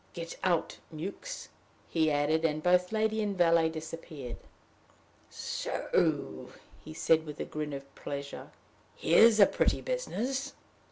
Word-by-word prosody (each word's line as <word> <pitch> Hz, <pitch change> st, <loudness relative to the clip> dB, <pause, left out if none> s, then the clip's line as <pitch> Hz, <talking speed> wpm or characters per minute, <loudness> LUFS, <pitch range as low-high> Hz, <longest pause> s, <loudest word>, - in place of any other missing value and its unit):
"Get 170 Hz, -1 st, -6 dB
out, 175 Hz, -3 st, +1 dB
Mewks," 195 Hz, -, -6 dB, 0.4 s
he 160 Hz, -2 st, +2 dB
added; 150 Hz, +2 st, +1 dB
and 155 Hz, -1 st, 0 dB
both 180 Hz, 0 st, +3 dB
lady 220 Hz, 0 st, +1 dB
and 205 Hz, -2 st, -2 dB
valet 165 Hz, -2 st, +4 dB
disappeared. 155 Hz, -5 st, -7 dB, 0.9 s
"So!" -, -, -1 dB, 0.3 s
he 155 Hz, -, -9 dB
said, 160 Hz, 0 st, +3 dB
with 150 Hz, -2 st, -8 dB
a -, -, -2 dB
grin 150 Hz, -1 st, -4 dB
of 140 Hz, 0 st, -8 dB
pleasure. 140 Hz, 0 st, -6 dB, 0.5 s
"Here's 220 Hz, +6 st, +6 dB
a 200 Hz, -, +10 dB
pretty -, -, +1 dB
business! 275 Hz, -, -2 dB
165 Hz, 125 wpm, -30 LUFS, 155-205 Hz, 0.9 s, a